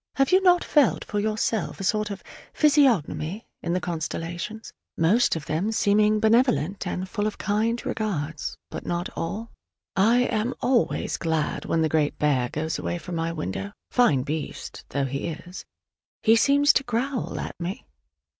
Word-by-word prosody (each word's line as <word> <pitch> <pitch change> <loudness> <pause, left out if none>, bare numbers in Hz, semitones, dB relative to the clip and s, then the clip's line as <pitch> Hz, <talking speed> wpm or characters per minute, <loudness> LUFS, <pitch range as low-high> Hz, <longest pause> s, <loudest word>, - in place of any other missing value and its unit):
Have 270 -1 +2
you 375 +1 +6
not 360 -2 +5
felt 290 -6 +3
for 205 - -2
yourself 215 +1 -1
a - - -4
sort 210 +2 +1
of 200 -1 -7 0.3
physiognomy 230 - +2 0.2
in 170 - -2
the 180 - +1
constellations, 175 +5 -5 0.2
most 185 +9 +3
of 155 -2 -5
them 175 +8 -1
seeming 215 0 +3
benevolent 220 - +2
and 185 +1 -3
full 205 +2 -1
of 215 - -4
kind 225 +3 0
regards: 165 -8 -3
but - - -6
not 175 +1 -2
all? 210 +8 -4 0.4
I 230 +6 +4
am 230 0 0
always 245 -1 +1
glad 160 -2 -1
when 165 -1 +1
the - - +3
Great 150 -1 +1
Bear 135 -5 +1
goes 160 +3 -3
away 175 - -2
from 175 +1 -8
my 165 0 -1
window, 100 - -4 0.2
fine 150 - +3
beast 150 +1 -5
though 140 -1 -1
he 140 +3 -3
is: 170 +3 -7 0.6
he 225 0 +6
seems 285 +5 +5
to 270 - +2
growl 245 +2 -2
at - - -4
me! 180 +4 -5
200 Hz, 165 wpm, -25 LUFS, 160-230 Hz, 0.6 s, you